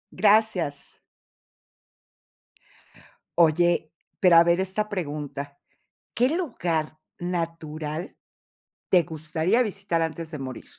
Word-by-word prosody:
Gracias. 200 -7 +1 2.4
Oye, 170 -1 +3 0.3
pero 180 -3 +6
a 165 - +9
ver 170 +1 +2
esta 195 +3 -2
pregunta, 145 -6 -5 0.6
¿qué 255 +6 +2
lugar 170 - -2 0.2
natural 165 -2 -4 0.7
te 180 -2 +5
gustaría 160 +8 0
visitar 195 -6 -2
antes 165 0 -3
de 150 - -6
morir? 130 -2 -7
170 Hz, 90 wpm, -25 LUFS, 155-190 Hz, 2.4 s, a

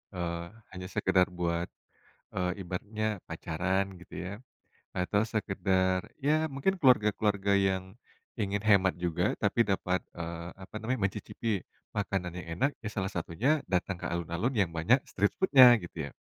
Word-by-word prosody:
Eee, 85 -1 -2 0.3
hanya 90 0 -6
sekedar 95 0 +3
buat 85 -1 -1 0.7
e - - -3 0.2
ibaratnya 105 +3 -3
pacaran, 95 +4 -1 0.2
gitu - - -12
ya. 95 - -4 0.7
Atau 100 +3 +1
sekedar, 95 -1 0
ya 155 +2 +2
mungkin 150 +8 0
keluarga-keluarga 105 -5 +3
yang 95 -1 +1 0.5
ingin 100 -1 -1
hemat 100 -3 +4
juga 85 -2 0
tapi 115 -2 +3
dapat, 95 -2 0
eee, 85 0 -5
apa 95 +2 -13
namanya, 120 +1 -1
mencicipi 105 0 -3 0.4
makanan 95 -4 -1
yang 90 - -7
enak 140 - +4
ya - - -1
salah 95 -1 -2
satunya 115 - 0
datang 90 0 -1
ke - - -5
alun-alun 85 +9 -1
yang 100 -6 +2
banyak 85 +11 +3
street 100 +1 +1
food-nya, 130 -9 +9
gitu 80 -4 -5
ya. - - -12
95 Hz, 145 wpm, -30 LUFS, 90-110 Hz, 0.7 s, food-nya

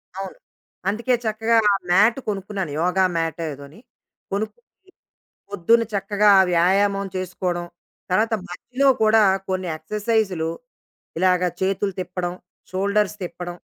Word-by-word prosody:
అవును. 195 -1 -6 0.5
అందుకే 235 +5 0
చక్కగా 225 +1 +1 0.3
మ్యాట్ 210 +7 +5
కొనుక్కున్నాను. 195 -4 -3
యోగ 180 +2 0 0.2
మాటో 165 0 -2
ఏదోని, 140 +5 -12 0.5
కొనుక్కుని, 375 - -6 0.6
పొద్దున్న 225 +4 +3
చక్కగా 205 +1 +2 0.2
వ్యాయామం 195 +3 +2
చేసుకోవడం, 180 -1 -3 0.5
తరువాత 220 +4 +2
మధ్యలో 250 +10 -1 0.2
కూడా 220 0 +5 0.3
కొన్ని 185 -1 -2
ఎక్సర్‌సైజ్‌లు 200 -1 -1 0.7
ఇలాగ 180 0 +3 0.2
చేతులు 195 +1 0
తిప్పడం 180 -1 -3 0.4
షోల్డర్స్ 200 +2 +1
తిప్పడం 175 0 -6
195 Hz, 100 wpm, -22 LUFS, 180-215 Hz, 0.7 s, మ్యాట్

